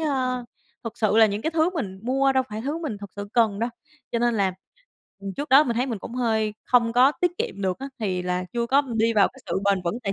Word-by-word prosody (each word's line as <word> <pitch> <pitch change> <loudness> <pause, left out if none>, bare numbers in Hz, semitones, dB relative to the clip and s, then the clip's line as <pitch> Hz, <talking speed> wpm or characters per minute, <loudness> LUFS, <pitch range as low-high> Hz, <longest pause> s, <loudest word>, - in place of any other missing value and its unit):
ơ 255 -5 -1 0.4
thực 230 0 -6
sự 215 -1 +2
là 225 -1 +7
những 205 +1 -3
cái 320 - 0
thứ 330 +2 +2
mình 195 - -4
mua 270 +3 +2
đâu 260 0 +3
phải 215 +1 -5
thứ 295 +5 -2
mình 295 -10 -4
thực 200 -1 -9
sự 205 0 -6
cần 220 -4 +2
đâu 235 +2 -1 0.4
cho 235 - +1
nên 240 0 +2
là, 195 -3 +1 0.7
ừm, 195 - -5
trước 290 +1 -4
đó 275 +4 +7
mình 235 -2 -2
thấy 250 - +1
mình 230 -6 -3
cũng 235 - -8
hơi 220 -4 0
không 235 -2 +3
có 255 +4 +5
tiết 355 -1 +2
kiệm 200 +1 -3
được 185 -1 -1
á 270 - -5
thì 185 -5 -2
là 180 0 -1
chưa 235 -1 -1
có 275 +4 +4
đi 225 +1 +3
vào 205 - +5
cái 265 - -18
sự - - -1
bền 195 -2 +2
vững 210 +8 -2
tài 195 -3 -1
230 Hz, 265 wpm, -24 LUFS, 205-265 Hz, 0.7 s, là